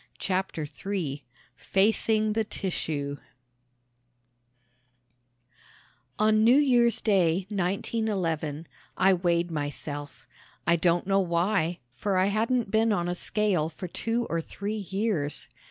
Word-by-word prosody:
CHAPTER 185 -4 -2
III 150 -2 -4 0.3
FACING 215 +2 +2
THE 225 +1 +1
TISSUE 150 -9 -3 3.0
On 215 0 +4
New 240 +4 +6
Year's 245 -5 +4
Day, 185 -4 +2
1911, 180 -5 -1 0.3
I 190 +1 +5
weighed 175 -1 +1
myself. 145 -4 -5 0.4
I 170 - +4
don't 170 +1 +2
know 195 0 +3
why, 175 -1 +1 0.2
for 195 +8 -1
I 185 - +4
hadn't 225 0 0
been 225 +1 +3
on 175 -4 0
a 175 - 0
scale 180 -4 0
for 175 +3 -7
two 230 +7 -2
or 165 0 -1
three 200 +5 -5
years. 190 -8 -2
185 Hz, 110 wpm, -27 LUFS, 165-215 Hz, 3.0 s, New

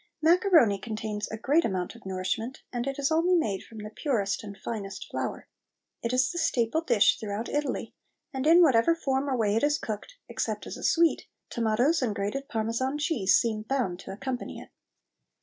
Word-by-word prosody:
Macaroni 320 - +4
contains 215 -1 -4
a 220 - -5
great 290 +9 +2
amount 185 -4 -2
of 235 -4 -13
nourishment, 190 +7 -3
and 240 +1 -2
it 275 - -3
is 280 +1 0
only 340 +3 +3
made 210 - 0
from 225 - -13
the 210 0 -7
purest 220 -6 -1
and 200 -1 -8
finest 200 -1 -6
flour. - - -4 0.5
It 230 - -2
is 255 +3 +2
the 345 - -3
staple 315 -2 +1
dish 240 -10 +3
throughout 215 +1 -4
Italy, 295 0 -2 0.4
and 265 +2 -1
in 340 +2 +8
whatever 275 +2 +4
form 275 -3 -1
or 260 - 0
way 210 -2 +1
it 225 - +2
is 295 +1 +2
cooked, 220 - -6
except - - -3
as - - -6
a - - -9
sweet, 335 -1 +3 0.2
tomatoes 240 +8 +2
and 225 -5 0
grated 210 +8 -3
Parmesan 230 +5 -1
cheese 290 - +3
seem 220 -2 0
bound 220 -7 -1
to 190 - -8
accompany 250 +5 -5
it. - - -12
240 Hz, 185 wpm, -28 LUFS, 215-290 Hz, 0.5 s, in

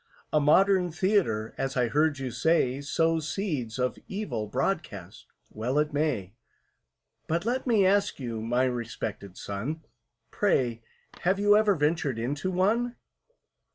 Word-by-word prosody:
"A 155 - +5
modern 180 +4 +4
Theatre, 165 - +1
as 135 0 -2
I 125 -1 +3
heard 150 +4 +2
you 130 -2 -4
say, 135 0 +1
Sows 160 +1 0
seeds 145 - -3
of 125 0 -1
evil 195 - -3
broadcast—well 115 - -4
it 150 0 +1
may; 140 - -1 0.9
But 170 +4 -1
let 255 +3 -1
me 215 -5 +4
ask 200 -1 +2
you, 115 -4 -4
my 120 +3 +1
respected 115 -6 -4
son, 130 +11 -5 0.5
Pray, 125 - +1 0.4
have 185 +2 +1
you 205 0 +5
ever 210 -2 +4
ventured 150 -4 0
into 145 +10 -2
one?" 220 +7 +1
150 Hz, 130 wpm, -27 LUFS, 120-185 Hz, 0.9 s, A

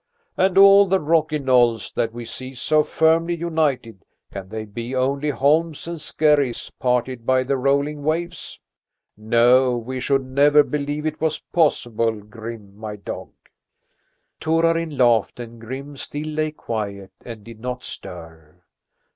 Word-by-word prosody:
And 190 0 +1
all 195 0 +8
the 190 +1 +2
rocky 155 -1 +1
knolls 125 -5 +2
that 115 - -1
we 120 +1 -8
see 130 +3 -7
so 155 +5 +2
firmly 165 +2 +2
united, 150 - -2 0.3
can 95 -1 -7
they 110 +1 -5
be 115 +5 -6
only 140 +3 0
holms 150 +5 +1
and 170 -2 -5
skerries 150 -5 +1
parted 125 -1 0
by 130 +1 +2
the 135 +2 -1
rolling 140 +3 0
waves? 165 +4 -3 0.6
No, 120 +4 +3
we 130 +2 -5
should 135 +1 0
never 145 +3 +4
believe 150 +1 -3
it 155 - -3
was 160 -1 -1
possible, 120 -8 +1
Grim, 105 -1 -10
my 105 0 -7
dog." 100 - -7 1.1
Torarin 165 -1 +1
laughed 120 -3 +2
and 115 -1 -9
Grim 135 +5 -7
still 145 +2 -5
lay 155 0 -1
quiet 105 -9 -5
and 115 -3 -9
did 115 -1 -12
not 125 +1 -5
stir. 80 -3 -11
130 Hz, 140 wpm, -22 LUFS, 115-155 Hz, 1.1 s, all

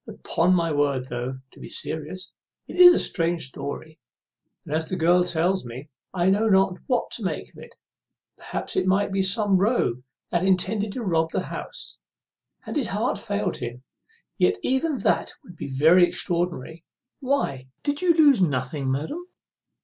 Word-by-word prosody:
Upon 180 +3 +1
my 170 -2 +1
word, 140 -3 0
though, 125 +2 -4
to - - -18
be - - -9
serious, 160 +4 -5 0.3
it - - -8
is 355 0 +10
a - - +3
strange 170 -2 0
story, 145 +4 -7 0.7
and, 145 - -5
as 160 0 -1
the 185 - -2
girl 175 +1 +4
tells 175 +2 0
it, 130 +6 -9 0.2
I 175 -1 0
know 210 +4 +3
not 190 -2 +3
what 250 -2 0
to 230 - -4
make 175 -5 -3
of - - -15
it. - - -13 0.6
Perhaps - - -5
it - - +1
might 195 +2 +2
be 195 0 +1
some 195 0 +2
rogue 195 - +1 0.3
that 175 0 +1
intended 200 +3 +1
to 250 - -4
rob 165 -4 +1
the - - -2
house, - - -8 0.7
and - - -6
his 280 -6 0
heart 210 +5 -1
failed 205 -4 -2
him; 120 +1 -7 0.5
yet 420 - +3
even 265 +3 0
that - - 0
would 180 -10 -14
be - - -6
very 160 +7 +5
extraordinary. 170 -4 -2 0.4
What, 255 - -1 0.2
did 290 +2 -1
you 350 -2 +4
lose 290 - +5
nothing, 135 -3 0
madam?" 290 - -4
180 Hz, 170 wpm, -24 LUFS, 155-210 Hz, 0.7 s, is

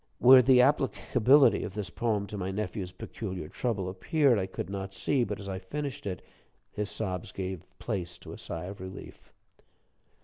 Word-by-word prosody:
Where 130 +1 +9
the 125 0 +6
applicability 135 -1 +4
of 95 - -6
this 105 -2 -3
poem 110 -4 0
to 105 - -7
my 95 -2 -3
nephew's 95 -2 -3
peculiar 95 -5 -6
trouble 105 -4 -2
appeared, 120 - +2
I 95 - -2
could 95 - -5
not 95 0 -5
see, 135 -4 +1
but 105 -2 -4
as 100 - -8
I 95 -1 -3
finished 135 +4 -5
it, 90 -3 -4 0.5
his 105 0 -3
sobs 95 -4 -4
gave 95 -2 -4 0.2
place 95 -7 -4
to - - -10
a - - -8
sigh 85 +1 -5
of 95 0 -8
relief. 95 0 -10
100 Hz, 175 wpm, -29 LUFS, 95-120 Hz, 0.5 s, Where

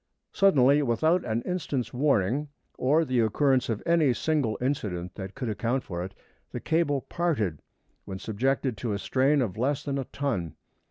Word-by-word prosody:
Suddenly 145 -7 +5
without 155 +8 +2
an 115 0 -1
instant's 145 - -3
warning, 135 0 +1 0.3
or 155 +5 +2
the 130 -3 0
occurrence 125 +4 +2
of 110 -3 -2
any 165 -6 +3
single 145 -9 0
incident 95 -10 -2
that 95 -1 -7
could 130 -3 -4
account 115 +4 -1
for 85 -1 -5
it, 95 +1 -8 0.3
the - - -5
cable 160 -4 +1
parted 120 - -1 0.4
when 95 - -6
subjected 125 +4 -1
to 115 -1 -2
a - - -1
strain 135 +6 +2
of 105 -5 -4
less 135 +3 0
than 140 -1 -2
a 135 - -3
ton. 115 - -3
130 Hz, 165 wpm, -27 LUFS, 110-145 Hz, 0.4 s, Suddenly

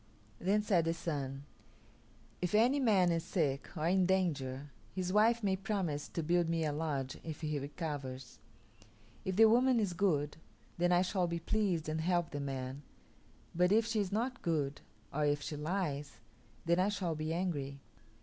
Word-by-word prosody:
Then 205 +4 +2
said 180 -6 +2
the 165 0 0
Sun, 140 -5 -4 1.0
"If 180 +3 0
any 245 +6 +4
man 200 -9 +4
is 165 -1 0
sick 150 -6 -1
or 155 - -1
in 185 0 +3
danger 145 -7 0 0.2
his 185 -1 -2
wife 225 +2 +4
may 195 -2 +2
promise 190 -7 -2
to 165 - -4
build 170 +1 +2
me 165 -1 +1
a 150 - 0
lodge 145 -3 -3
if 160 -2 -6
he 150 -2 -1
recovers. 140 -3 -5 0.9
If 190 - -1
the 225 +3 +8
woman 245 +2 +5
is 200 -5 0
good, 155 -6 +1 0.4
then 175 +1 +3
I 175 +1 +5
shall 185 -1 0
be 170 0 -2
pleased 175 -2 0
and 155 +1 -1
help 175 0 +1
the 145 - -4
man; 135 -1 -4 0.7
but 180 +2 +3
if 220 +2 +4
she 225 -1 0
is 200 -3 -1
not 245 +5 -1
good, 150 -4 -1 0.3
or 150 +2 0
if 145 -1 +1
she 150 - -4
lies, 150 -2 -2 0.5
then 170 +2 +3
I 190 +2 +3
shall 185 -5 -1
be 155 +1 -3
angry. 150 -6 -2
170 Hz, 175 wpm, -34 LUFS, 145-190 Hz, 1.0 s, the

